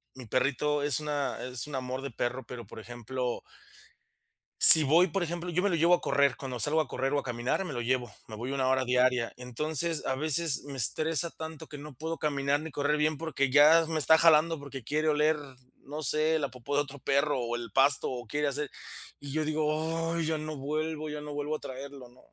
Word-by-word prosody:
mi 130 -1 -10
perrito 145 +5 0
es 145 +1 +1
una 145 -2 -3
es 125 +2 -5
un 150 - -6
amor 130 0 -4
de 140 - -5
perro, 120 +2 -3
pero, 120 -2 -8
por 110 - -11
ejemplo 120 +2 -5 1.2
si 160 - +12
voy, 165 +6 +4
por 185 +2 -2
ejemplo, 175 +1 -4
yo 180 +2 -1
me 205 - +2
lo 175 - 0
llevo 170 +2 +4
a - - -8
correr, 140 -2 +2
cuando 130 -5 -6
salgo 155 +5 +1
a - - -5
correr 135 +2 -2
o 145 - +2
a - - -6
caminar, 125 +9 -2
me 150 - -6
lo 120 - -3
llevo, 125 0 -1 0.2
me 110 - -8
voy 120 +5 -5
1 135 -2 -1
hora 130 0 +1
diaria, 125 -1 +1
entonces, 155 +6 -1
a 130 - -1
veces 155 +1 +1
me 140 -1 -8
estresa 160 +7 +1
tanto 160 0 -9
que 145 - -10
no 150 0 -10
puedo 160 +4 -5
caminar 140 -1 0
ni 160 +1 -7
correr 145 +2 0
bien 150 0 0
porque 140 -4 -2
ya 150 +4 +6
me 160 - -2
está 160 +2 +5
jalando 165 0 +4
porque 140 -3 -9
quiere 155 +6 -1
oler, 150 +1 +2 0.5
no 150 +3 -7
sé, 155 +3 +1
la 140 -3 -2
popo 130 +3 -5
de 145 - +3
otro 140 -1 -12
perro 140 +1 0
o 120 -1 -3
el 120 -1 -7
pasto 135 0 +3
o 120 -2 -7
quiere 150 +4 -1
hacer, 145 +1 -3 0.5
y 140 -1 -9
yo 155 +1 -1
digo: 155 +2 -1
"Ay, 170 -1 -1
ya 160 -1 -1
no 155 0 -6
vuelvo 155 +2 -4
ya 150 0 -6
no 150 0 -7
vuelvo 145 +1 -3
a - - -6
traerlo", 135 0 -9
¿no?, 125 +1 -22
145 Hz, 225 wpm, -28 LUFS, 130-155 Hz, 1.2 s, si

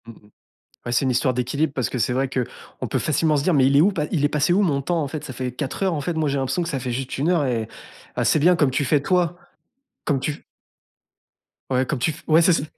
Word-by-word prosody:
Mmh 115 - -9
mh. 105 -1 -21 0.6
Bah, 120 - -4
c'est 125 - +2
une 130 - +1
histoire 125 +1 +1
d'équilibre 140 +5 -1
parce 130 - -1
que 125 - -3
c'est 120 +2 +1
vrai 130 +1 0
qu'on 125 -2 -5
peut - - -1
facilement 155 +1 +1
se 140 - 0
dire: 175 +3 +2
«Mais 135 -3 +4
il 140 +1 +3
est - - +7
où 185 +6 +5
pa 170 -7 -2
il 150 -6 +1
est - - +4
passé 150 +3 +1
où 195 +4 +3
mon 145 -8 +1
temps, 170 +3 0
en 145 - -3
fait, 155 +1 -6
ça - - -7
fait 130 0 -4
4 135 +7 -5
heures, 190 -3 +1
en 150 - -2
fait, 160 +5 -2
moi 160 -2 0
j'ai 140 0 0
l'impression 135 +6 -1
que 165 - -3
ça 145 -5 -2
fait 125 -1 -4
juste 130 +2 -4
1 145 +5 0
heure» 170 -5 +2
et 115 -4 -1 0.5
ah, - - -1
c'est - - +3
bien 175 +5 +5
comme 145 -5 +2
tu 145 - 0
fais, 145 +2 +2
toi, 175 +1 +1 0.7
comme 145 -3 +1
tu 145 +3 -4 1.3
Ouais, 130 0 +1
comme 140 0 -2
tu 140 - +1
f 150 - -12
ouais, 160 +1 +5
c'est 175 - +5
c 150 - 0
140 Hz, 285 wpm, -22 LUFS, 130-160 Hz, 1.3 s, est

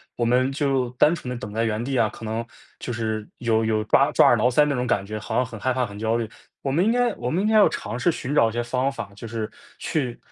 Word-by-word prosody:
我 120 - -2
们 125 +2 +3
就 135 -3 0
单 125 +6 +4
纯 155 -7 -5
地 125 - -4
等 105 -3 -7
在 115 +1 0
原 110 0 -1
地 135 +1 -2
啊， 110 - +4
可 - - -12
能 110 +1 -3 0.3
就 120 - -4
是 110 -2 -3
有 115 -2 +1
有 110 -1 +1
抓 135 +6 +4
抓 - - +6
耳 120 - +5
挠 120 +3 +3
腮 140 +4 +4
那 145 - 0
种 125 0 -1
感 100 -5 +1
觉 110 +1 -5
好 110 +1 -5
像 125 +2 +2
很 115 -2 -9
害 130 +4 0
怕， 125 0 0
很 100 -2 -9
焦 110 +1 0
虑。 115 -2 -3 0.3
我 135 - -2
们 170 +7 +2
应 - - +3
该 245 -1 +2
我 120 - -3
们 170 +8 0
应 - - +1
该 220 - +2
要 210 -2 +7
尝 120 - -5
试 125 - +2
寻 140 -3 -4
找 115 -6 +4
一 - - -8
些 120 0 -1
方 130 +3 0
法， 115 -6 -7
就 115 - -8
是 110 -1 -4 0.3
去， 125 -6 -2
120 Hz, 315 characters per minute, -24 LUFS, 110-135 Hz, 0.3 s, 要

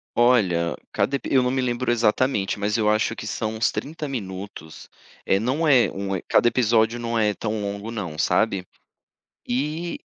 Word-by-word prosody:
Olha, 95 -9 +3 0.2
cada 140 - 0
epi - - -4
eu 130 - +6
não 125 - +1
me 130 0 0
lembro 125 0 -1
exatamente, 115 -3 +1
mas 105 +1 0
eu 105 -1 +2
acho 110 0 +1
que - - -7
são 110 0 -3
uns 110 - +1
30 150 -1 -5
minutos, 95 - -7 0.4
eh 95 - +3
não 135 +8 0
é 130 -5 +5
um 95 -1 -3
cada 120 - +4
episódio 115 -1 +2
não 115 -1 -2
é 105 -2 +2
tão 110 0 -3
longo 100 +2 -4
não, 90 -9 -5
sabe? 95 +1 +1 0.8
E 150 +7 -2
110 Hz, 170 wpm, -23 LUFS, 100-125 Hz, 0.8 s, eu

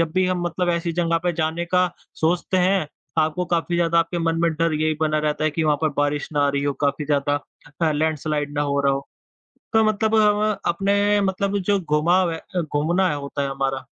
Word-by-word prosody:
जब 165 -1 0
भी 185 0 +2
हम 180 -1 -1
मतलब 175 +1 -2
ऐसी 170 0 -1
जगह 165 0 +1
पे 175 - +2
जाने 160 +1 -1
का 180 +1 +2 0.3
सोचते 175 +3 +1
हैं, 185 -2 +2 0.3
आपको 160 +3 +1
काफ़ी 175 0 -1
ज़्यादा 170 -1 +2
आपके 165 +1 0
मन 165 0 0
में 170 - +3
डर 165 +1 0
यही 155 +1 +1
बना 155 -1 +1
रहता 150 0 -1
है 155 - +2
कि 160 +2 -1
वहाँ 150 -1 +3
पर 155 - +3
बारिश 145 0 0
ना 145 - +1
आ - - +2
रही 140 0 -1
हो, 145 - +1
काफ़ी 140 +1 -1
ज़्यादा 145 0 0 0.4
अ, 160 -2 +3
लैंडस्लाइड 150 -1 -1
ना - - +2
हो 140 -1 0
रहा 140 -1 +2
हो। 135 +1 -4 0.6
तो 225 - +4
मतलब 215 +1 +1
हम 210 -1 +4 0.3
अपने 200 +3 +2
मतलब 195 +1 0
जो 200 +1 +1
घुमाव 170 +3 +2
है 165 - -4
अ, 180 +1 -4
घूमना 165 +5 +1
है - - -1
होता 140 0 -4
है 140 - -1
हमारा, 135 -1 -2
165 Hz, 225 wpm, -22 LUFS, 150-180 Hz, 0.6 s, तो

